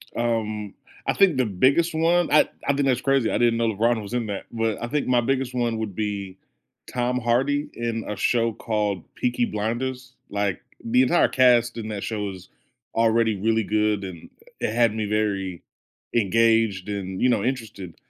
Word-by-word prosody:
Um, 110 -3 -2 0.3
I - - +1
think 190 -8 +4
the 130 - +2
biggest 130 - +2
one 170 +2 +2
I 150 - +5 0.2
I 140 - +3
think 140 0 0
that's 125 -2 +1
crazy, 135 -4 +2
I - - +1
didn't 120 -1 +3
know 115 0 +1
LeBron 115 +2 +1
was 100 +2 -8
in 120 -2 -1
that, 100 -2 -5
but 115 -2 -1
I 120 - -2
think 145 +3 -1
my 125 -1 +3
biggest 130 0 -1
one 120 -2 0
would 105 -4 -4
be 100 -3 -4 0.5
Tom 125 0 0
Hardy 135 +5 +1
in 115 -1 -3
a 105 - -3
show 115 +2 +1
called 105 -4 -2
Peaky 120 -1 0
Blinders, 125 +4 -3 0.2
like, 100 -2 -1 0.2
the 125 +3 +3
entire 170 +7 +4
cast 120 -2 +3
in 110 - -5
that 105 -2 -4
show 110 -2 -3
was 95 -2 -8 0.5
already 115 -1 +3
really 110 +3 +1
good, 105 0 0
and 90 -4 -8 0.3
it 105 - -1
had 115 -2 +3
me 110 -1 -2
very 100 -4 -1 0.5
engaged 110 -2 +2
and, 95 -2 -4
you 125 - +4
know, 110 -5 +1
interested. 110 -8 -4
115 Hz, 180 wpm, -24 LUFS, 105-125 Hz, 0.5 s, I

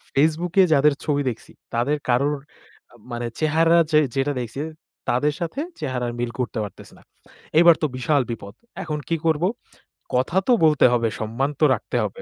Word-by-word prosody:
FaceBook 160 +4 +1 0.2
যাদের 145 +1 +4
ছবি 145 -1 0
দেখছি, 115 - -9 0.2
তাদের 130 +6 +1
কারোর 140 +4 +2 0.8
মানে 120 0 -3
চেহারা 165 +2 +3
যে 155 - +6 0.2
যেটা 140 +2 0
দেখছি। 120 +3 -5 0.5
তাদের 145 +5 +1
সাথে 170 - -3 0.2
চেহারা 130 -4 -2
মিল 120 -1 -2
করতে 125 -1 -2
পারতেছে 100 - -10
না। - - -20 0.6
এবার 170 -1 +7
তো - - +2
বিশাল 140 +2 +2
বিপদ। 100 -3 -7 0.3
এখন 150 -2 -3
কি 165 - +2
করব? 160 0 +2 0.7
কথা 130 +9 +1
তো - - +4
বলতে 150 -2 +5
হবে, 115 -1 +2
সম্মান 115 +6 -1
তো 155 - +5
রাখতে - - -4
হবে। 485 - -5
145 Hz, 160 wpm, -23 LUFS, 120-155 Hz, 0.8 s, এবার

